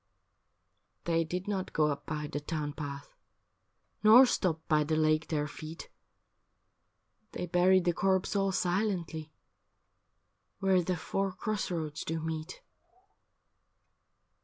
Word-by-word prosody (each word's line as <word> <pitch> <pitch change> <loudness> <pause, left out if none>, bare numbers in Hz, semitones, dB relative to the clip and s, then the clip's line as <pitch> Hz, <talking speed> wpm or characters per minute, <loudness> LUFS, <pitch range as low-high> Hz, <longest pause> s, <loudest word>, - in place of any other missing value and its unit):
' 90 +4 -48
They 165 -1 +2
did 180 +4 -4
not 195 -2 -3
go 155 -1 +3
up 140 - -6
by 150 -1 -3
the 145 - -4
town 150 -1 -4
path, 140 -2 -7 0.9
Nor 225 +5 +9
stopped 170 -9 -1
by 155 -2 +3
the 155 +1 0
lake 155 0 +2
their 150 -2 -1
feet, 155 +2 -8 1.4
They - - -3
buried 180 +1 +3
the 175 - +3
corpse 190 +2 +1
all 195 -1 +2
silently 175 -4 -1 1.3
Where 190 -2 +3
the 180 +1 -1
four 195 +4 -2
cross 210 +3 -3
roads 155 -3 -3
do 165 0 -3
meet.' 160 +2 -5
165 Hz, 125 wpm, -31 LUFS, 155-185 Hz, 1.4 s, Nor